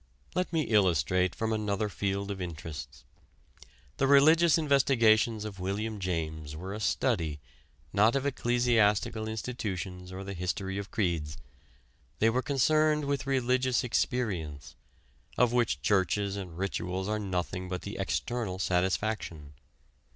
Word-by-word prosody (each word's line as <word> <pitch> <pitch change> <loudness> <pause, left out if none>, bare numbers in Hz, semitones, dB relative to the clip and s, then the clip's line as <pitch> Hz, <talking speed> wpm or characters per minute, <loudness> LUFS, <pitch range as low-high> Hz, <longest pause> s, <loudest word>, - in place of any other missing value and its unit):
Let 180 0 -1
me 160 -2 +1
illustrate 90 - +2
from 110 0 -1
another 105 -1 -1
field 100 0 -2
of 95 -1 -5
interests. 80 -4 -7 0.9
The 135 - +2
religious 155 +4 +6
investigations 115 -7 +3
of 100 -3 -7
William 105 +3 -3
James 80 -4 -3
were 95 +5 -6
a 105 - -5
study, 80 -7 0 0.5
not 105 +5 +4
of 135 0 0
ecclesiastical 120 -4 +2
institutions 100 -5 -4
or 95 +1 -6
the 100 0 -6
history 95 +2 -3
of 100 - -6
creeds. 85 -7 -1 0.8
They 110 +5 +3
were 125 +2 +1
concerned 150 +3 +2
with 140 -1 -2
religious 130 -1 +1
experience, 85 - -2 0.6
of 120 -1 +3
which 115 - +1
churches 100 +2 +1
and 90 -4 -7
rituals 95 0 -2
are 105 0 -1
nothing 90 -2 -3
but 90 0 -4
the - - -6
external 115 -6 -2
satisfaction. 90 -4 -1
100 Hz, 130 wpm, -29 LUFS, 90-120 Hz, 0.9 s, religious